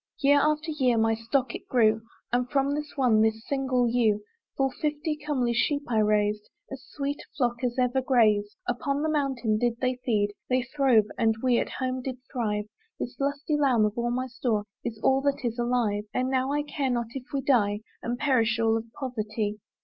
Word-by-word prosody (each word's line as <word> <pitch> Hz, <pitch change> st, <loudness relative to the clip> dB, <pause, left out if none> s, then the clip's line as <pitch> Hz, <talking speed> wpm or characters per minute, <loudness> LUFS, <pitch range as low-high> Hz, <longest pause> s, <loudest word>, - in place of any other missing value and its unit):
Year 285 Hz, -1 st, +4 dB
after 305 Hz, +2 st, +1 dB
year 255 Hz, -6 st, +2 dB
my 225 Hz, 0 st, +3 dB
stock 235 Hz, +3 st, -1 dB
it -, -, -8 dB
grew, 220 Hz, -3 st, +3 dB, 0.3 s
And 245 Hz, 0 st, +1 dB
from 275 Hz, 0 st, +1 dB
this 295 Hz, 0 st, -4 dB
one, 240 Hz, -5 st, +4 dB
this 220 Hz, +1 st, +1 dB
single 260 Hz, -3 st, +1 dB
ewe, 225 Hz, -3 st, +2 dB, 0.3 s
Full 270 Hz, -1 st, +2 dB
fifty 300 Hz, +2 st, -2 dB
comely 285 Hz, -6 st, -1 dB
sheep 285 Hz, +4 st, +1 dB
I 230 Hz, -3 st, +1 dB
raised, 210 Hz, 0 st, +1 dB, 0.2 s
As 270 Hz, -1 st, -6 dB
sweet 285 Hz, 0 st, -3 dB
a -, -, -11 dB
flock 240 Hz, -2 st, 0 dB
as 245 Hz, 0 st, -1 dB
ever 255 Hz, +1 st, +2 dB
grazed! 215 Hz, -5 st, +3 dB
Upon 275 Hz, +4 st, -1 dB
the 315 Hz, -, +1 dB
mountain 260 Hz, -7 st, 0 dB
did 240 Hz, 0 st, 0 dB
they 255 Hz, -1 st, 0 dB
feed; 205 Hz, -4 st, +1 dB, 0.2 s
They 255 Hz, 0 st, +2 dB
throve, 260 Hz, -4 st, +3 dB
and 225 Hz, -1 st, +3 dB
we 250 Hz, -2 st, +3 dB
at -, -, -2 dB
home 255 Hz, -1 st, -3 dB
did 255 Hz, 0 st, -4 dB, 0.2 s
thrive. 210 Hz, -5 st, -1 dB, 0.3 s
This 240 Hz, -, -4 dB
lusty 285 Hz, +2 st, -1 dB
lamb 260 Hz, -7 st, +3 dB
of 210 Hz, 0 st, -1 dB
all 240 Hz, 0 st, -1 dB
my 255 Hz, +2 st, -1 dB
store 230 Hz, -4 st, -1 dB, 0.2 s
Is 225 Hz, -2 st, -4 dB
all 265 Hz, 0 st, +4 dB
that 280 Hz, -2 st, -1 dB
is 235 Hz, 0 st, -2 dB
alive: 235 Hz, -4 st, 0 dB
And 255 Hz, +1 st, 0 dB
now 260 Hz, +1 st, +1 dB
I 295 Hz, 0 st, 0 dB
care 285 Hz, -2 st, -2 dB
not 240 Hz, -2 st, -1 dB
if 265 Hz, -2 st, -6 dB
we 275 Hz, -, -1 dB
die, 210 Hz, -6 st, +2 dB, 0.2 s
And 240 Hz, +1 st, -2 dB
perish 240 Hz, -5 st, +2 dB
all 225 Hz, 0 st, +3 dB
of 225 Hz, -, -5 dB
poverty. 215 Hz, -5 st, -3 dB
245 Hz, 200 wpm, -27 LUFS, 225-275 Hz, 0.3 s, Year